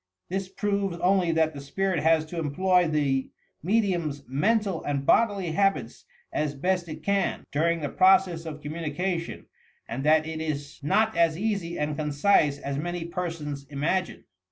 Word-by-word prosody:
This 190 +1 -3
proves 200 -2 -1
only 180 -1 +2
that 160 -1 +2
the 140 - -7
spirit 185 +5 -1
has 160 0 +3
to 165 +2 -6
employ 180 +4 +2
the 140 -4 0 0.3
medium's 175 -7 0
mental 195 - +1
and 140 -1 -2
bodily 200 -5 +3
habits 195 +4 0 0.3
as 150 -1 -1
best 180 +3 -1
it 155 0 -8
can, 200 -1 0
during 165 +3 +1
the 145 - -2
process 185 -3 +3
of 150 -1 -7
communication, 165 +3 -3 0.4
and 130 +4 -4
that 155 +1 +4
it 160 0 -5
is 145 -2 -4
not 215 +10 +2
as 165 -1 +3
easy 195 -4 -2
and 150 0 -1
concise 150 0 +2
as 140 0 -4
many 175 +1 -3
persons 165 -5 -5
imagine. 155 +6 -1
165 Hz, 155 wpm, -26 LUFS, 150-190 Hz, 0.4 s, that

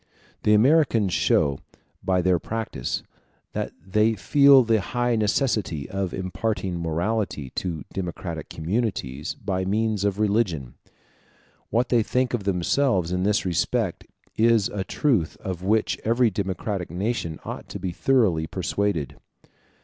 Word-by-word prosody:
The 105 - +4
Americans 115 - +3
show, 70 -2 +2 0.4
by 90 -1 +1
their 90 -1 +3
practice, 110 - -3 0.5
that - - -3
they 105 +4 +2
feel 135 +7 +6
the 110 -2 +2
high 120 +4 0
necessity 105 - 0
of 95 -2 -3
imparting 95 -1 -2
morality 85 - -2
to 85 -4 -3
democratic 85 -3 -5
communities 80 - -2
by 95 -1 -2
means 105 +1 0
of 100 -1 0
religion. 100 - 0 1.0
What 120 +3 +1
they 120 -2 +4
think 125 +3 0
of 110 -5 -2
themselves 95 0 +1
in 90 0 0
this 105 +1 +1
respect 90 -3 -1 0.3
is 115 -2 +3
a 100 -2 -3
truth 105 - 0
of 90 -2 -5
which 95 -1 +1
every 115 +1 +3
democratic 95 -1 -3
nation 90 -2 -2
ought - - -7
to - - -5
be 95 -1 -3
thoroughly 95 -7 +2
persuaded. 95 -4 -2
100 Hz, 130 wpm, -24 LUFS, 90-115 Hz, 1.0 s, feel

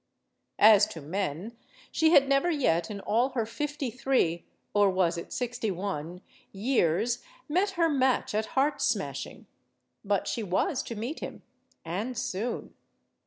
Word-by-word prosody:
As 210 -1 +7
to 190 -6 -8
men, 185 +6 -3 0.4
she 320 -1 +3
had 280 -4 +6
never 275 +5 +3
yet 175 - +1
in 200 -2 -6
all 235 +7 +2
her 230 - +1
fifty 290 +2 -3
three 235 -9 0 0.3
or 205 -1 +5
was 185 -2 +1
it 170 - -7
sixty 245 -3 -2
one? 180 -2 -4 0.3
years, 220 0 +1 0.3
met 365 +7 +2
her 335 -1 +4
match 265 -7 +1
at 215 +1 0
heart 280 +2 +2
smashing. - - -2 0.6
But 200 -1 0
she 235 - -2
was 225 - 0
to 230 - -5
meet 235 +9 -4
him. - - -7 0.4
And 210 +9 -3
soon. 225 +2 -3
220 Hz, 145 wpm, -28 LUFS, 190-265 Hz, 0.6 s, As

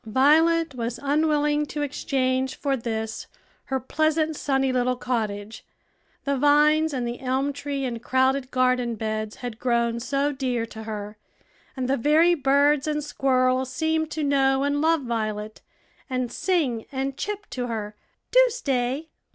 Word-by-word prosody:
Violet 315 +6 +4
was 235 -1 -4
unwilling 295 0 +1
to 295 0 -3
exchange 265 -2 -1
for 275 -1 -1
this 220 -2 -4 0.4
her 265 0 -1
pleasant, 310 +3 0
sunny 270 -2 0
little 250 0 +1
cottage; 220 -4 -3 0.6
the 280 0 0
vines 300 +3 +4
and 250 -4 -2
the 240 +1 -5
elm 265 +2 -1
tree 280 -1 -3
and 235 -3 -4
crowded 260 +1 +1
garden 255 -2 +1
beds 215 0 -3
had 235 -2 -6
grown 235 -1 +1
so 275 +4 0
dear 255 -4 -2
to 220 -1 -10
her, 210 -1 -6 0.6
and 255 -1 -1
the 270 +1 +1
very 310 +7 +4
birds 285 -1 +3
and 300 -1 -1
squirrels 260 -2 +1
seemed 315 +3 0
to 315 -1 -3
know 270 -1 +2
and 285 +1 0
love 325 0 +3
Violet, 215 -3 -3 0.5
and 255 -2 -2
sing 275 - 0
and 270 0 -2
chip 415 +5 -4
to 250 -1 -3
her, 215 -2 -4 0.4
"Do - - +7
stay." 280 - -2
265 Hz, 150 wpm, -25 LUFS, 240-295 Hz, 0.6 s, Do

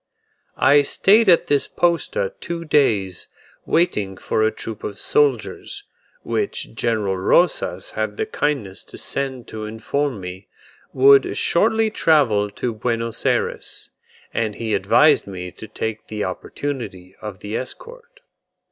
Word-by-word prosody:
I 145 +1 +6
stayed 200 +9 +4
at 170 - +5
this 145 -1 +1
posta 465 - 0
two 170 - -5
days, 105 - +1 0.4
waiting 105 - +1
for 110 - -1
a 110 - +4
troop 110 -1 -7
of 100 - -5
soldiers, 435 -1 0 0.4
which 415 - -2
General 110 -4 0
Rosas 135 - +1
had - - -3
the 440 - 0
kindness 140 - -2
to - - -12
send 130 -3 -3
to 110 -1 -6
inform 115 +3 -2
me, 90 +1 -8 0.4
would 135 +1 +5
shortly 220 +4 +2
travel 125 - +3
to 120 +3 -3
Buenos 115 0 -2
Ayres; - - -2 0.4
and 110 -2 -1
he 110 -2 -3
advised - - +4
me 90 -2 -6
to 110 - -11
take 110 +1 -5
the 105 -1 -3
opportunity 95 -2 -5
of 105 -4 -7
the 105 +2 -5
escort. - - -7
120 Hz, 130 wpm, -21 LUFS, 105-170 Hz, 0.4 s, I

